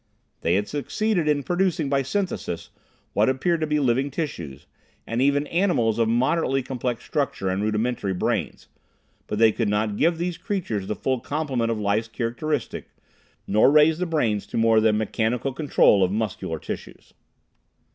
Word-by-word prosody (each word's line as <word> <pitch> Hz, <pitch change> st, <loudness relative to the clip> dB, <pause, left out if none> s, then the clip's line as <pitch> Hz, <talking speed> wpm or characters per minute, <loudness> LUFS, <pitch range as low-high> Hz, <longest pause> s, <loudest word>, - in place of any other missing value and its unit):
They 85 Hz, -, +2 dB
had 105 Hz, +1 st, 0 dB
succeeded 175 Hz, +4 st, -1 dB
in 145 Hz, -2 st, +2 dB
producing, 175 Hz, -3 st, 0 dB
by 135 Hz, 0 st, +1 dB
synthesis, 135 Hz, -, -3 dB, 0.4 s
what -, -, +3 dB
appeared 160 Hz, +6 st, 0 dB
to 155 Hz, -, 0 dB
be 150 Hz, 0 st, +1 dB
living 135 Hz, +1 st, +1 dB
tissues, 85 Hz, -, -5 dB, 0.4 s
and 115 Hz, +2 st, -2 dB
even 140 Hz, +1 st, +2 dB
animals 150 Hz, -, +1 dB
of 115 Hz, -1 st, +2 dB
moderately 135 Hz, +3 st, +1 dB
complex 125 Hz, -2 st, -3 dB
structure 140 Hz, -, -1 dB
and 95 Hz, +1 st, -1 dB
rudimentary 105 Hz, -2 st, -1 dB
brains, 100 Hz, -3 st, -2 dB, 0.6 s
but 105 Hz, -, -3 dB
they 110 Hz, 0 st, +5 dB
could 110 Hz, -1 st, -1 dB
not 105 Hz, 0 st, 0 dB
give 165 Hz, +1 st, +2 dB
these 175 Hz, 0 st, -3 dB
creatures 115 Hz, -, -3 dB
the 105 Hz, -, -2 dB
full 130 Hz, -2 st, -1 dB
complement 135 Hz, -5 st, -2 dB
of 115 Hz, -2 st, -1 dB
life's 105 Hz, +2 st, 0 dB
characteristics, 125 Hz, +6 st, -3 dB, 0.6 s
nor 105 Hz, +5 st, +4 dB
raise 155 Hz, +2 st, +5 dB
the 180 Hz, -, -1 dB
brains 110 Hz, -11 st, 0 dB
to -, -, -5 dB
more 115 Hz, -1 st, +4 dB
than 110 Hz, -1 st, +3 dB
mechanical 110 Hz, +4 st, -1 dB
control 135 Hz, -8 st, +4 dB
of 90 Hz, -, +1 dB
muscular 105 Hz, -1 st, -2 dB
tissues. -, -, -8 dB
125 Hz, 160 wpm, -24 LUFS, 110-150 Hz, 0.6 s, they